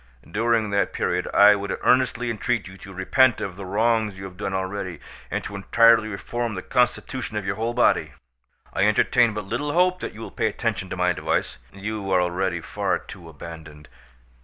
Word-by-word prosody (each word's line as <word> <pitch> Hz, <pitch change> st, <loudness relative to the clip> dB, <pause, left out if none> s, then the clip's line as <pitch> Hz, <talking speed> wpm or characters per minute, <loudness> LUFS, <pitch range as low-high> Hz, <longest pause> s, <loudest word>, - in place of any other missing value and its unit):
During 110 Hz, +3 st, +1 dB
that 100 Hz, 0 st, +1 dB
period 90 Hz, +1 st, -1 dB
I 105 Hz, +1 st, +7 dB
would 100 Hz, -1 st, -3 dB
earnestly 125 Hz, -2 st, +2 dB
entreat 115 Hz, -1 st, -1 dB
you 95 Hz, -, -11 dB
to 95 Hz, 0 st, -12 dB
repent 120 Hz, +7 st, +3 dB
of 95 Hz, -3 st, -4 dB
the 95 Hz, 0 st, -8 dB
wrongs 110 Hz, 0 st, +1 dB
you 95 Hz, -, -7 dB
have 95 Hz, -1 st, -9 dB
done 100 Hz, +1 st, -4 dB
already, 95 Hz, -1 st, -3 dB, 0.3 s
and -, -, -2 dB
to 100 Hz, -, -6 dB
entirely 115 Hz, +2 st, +4 dB
reform 115 Hz, +2 st, -4 dB
the 95 Hz, -, -5 dB
constitution 125 Hz, -2 st, -1 dB
of 105 Hz, -, -3 dB
your 100 Hz, +1 st, -1 dB
whole 115 Hz, +2 st, -2 dB
body. 125 Hz, -, +2 dB, 0.6 s
I 95 Hz, -, +2 dB
entertain 115 Hz, +2 st, +3 dB
but 105 Hz, -2 st, -4 dB
little 135 Hz, +8 st, -2 dB
hope 180 Hz, +1 st, +3 dB
that -, -, -6 dB
you 110 Hz, -, -10 dB
will -, -, -7 dB
pay -, -, 0 dB
attention 105 Hz, -3 st, -2 dB
to 95 Hz, -, -5 dB
my 90 Hz, 0 st, +2 dB
advice; -, -, -2 dB
you 100 Hz, 0 st, -5 dB
are 95 Hz, -, +4 dB
already 90 Hz, 0 st, -1 dB
far -, -, -1 dB
too 85 Hz, -3 st, -12 dB
abandoned. 80 Hz, -1 st, -11 dB
100 Hz, 190 wpm, -24 LUFS, 95-115 Hz, 0.6 s, I